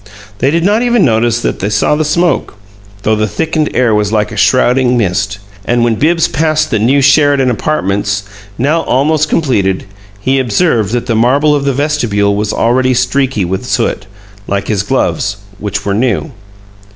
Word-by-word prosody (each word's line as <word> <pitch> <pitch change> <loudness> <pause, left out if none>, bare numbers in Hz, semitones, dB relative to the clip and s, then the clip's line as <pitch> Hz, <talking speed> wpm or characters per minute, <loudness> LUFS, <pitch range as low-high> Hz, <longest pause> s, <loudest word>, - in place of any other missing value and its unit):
They 135 - +2
did 165 +3 0
not 210 +3 +2
even 240 -4 +2
notice 115 0 +1
that - - -2
they 100 - -2
saw 105 +7 +1
the 155 - 0
smoke, 160 -2 0 0.5
though 110 +1 +2
the 110 0 0
thickened 155 - -1
air 120 -3 +2
was 105 -1 0
like 105 -1 0
a - - -7
shrouding 125 0 +2
mist. 95 -3 -1 0.3
And 120 +3 +1
when 120 -1 +2
Bibbs 165 +8 +1
passed 155 0 0
the 110 - +1
new 135 +6 +2
"Sheridan 145 -2 +3
Apartments," 100 -5 -1 0.3
now 150 +6 +1
almost 155 +3 +1
completed, 100 - 0 0.3
he 130 +6 0
observed 120 - +1
that 120 -1 -1
the 120 - -1
marble 135 +7 +2
of 145 -1 -1
the 140 - +1
vestibule 120 -8 0
was 105 0 -1
already 130 +2 +1
streaky 130 -4 0
with 95 +2 -3
soot, 100 - -2 0.4
like 100 0 -2
his 105 -3 +1
gloves, 100 0 -1 0.2
which 100 0 -4
were 100 - 0
new. 125 +7 -1
125 Hz, 175 wpm, -12 LUFS, 105-150 Hz, 0.5 s, Sheridan